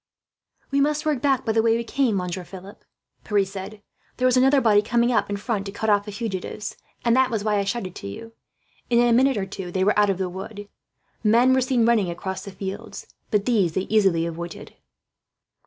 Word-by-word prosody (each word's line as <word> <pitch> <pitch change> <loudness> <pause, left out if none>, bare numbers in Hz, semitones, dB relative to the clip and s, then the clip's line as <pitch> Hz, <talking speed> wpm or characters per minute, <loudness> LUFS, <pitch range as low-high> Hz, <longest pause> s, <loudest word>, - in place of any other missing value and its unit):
"We 280 0 +2
must 300 +1 0
work 295 -5 0
back 270 -3 +1
by 225 - +1
the 225 0 +3
way 225 0 +3
we 235 - -3
came, 250 -2 0
Monsieur 180 0 -3
Philip," 190 +2 -12 0.4
Pierre 205 -2 +1
said. 195 +2 -8 0.3
"There 255 - +2
is 255 - +3
another 270 +2 +5
body 215 -5 +4
coming 235 +3 +1
up 230 - +1
in 205 - -2
front, 205 -2 -3
to - - -5
cut 215 +2 -1
off 205 0 +2
fugitives; 210 -1 -5 0.3
and 235 0 +4
that 260 -1 +3
was 220 -4 -2
why 210 -1 +1
I - - +1
shouted 195 -3 -3
to - - -7
you." 225 - -9 0.6
In 240 - +3
a 240 0 +4
minute 265 +1 +3
or 195 - -1
two 190 -2 -7
they 185 +1 0
were 210 +1 +3
out 205 -1 +4
of 195 - 0
the 190 -1 -1
wood. 200 +3 -8 0.6
Men 235 +4 +4
were 260 - +3
seen 250 -2 +2
running 225 -6 +3
across 190 +2 -5
the 200 - -8
fields, 200 +2 -7 0.2
but 210 -1 +1
these 205 -9 +2
they 190 - 0
easily 195 -5 +2
avoided. 170 0 -7
210 Hz, 215 wpm, -23 LUFS, 195-235 Hz, 0.6 s, another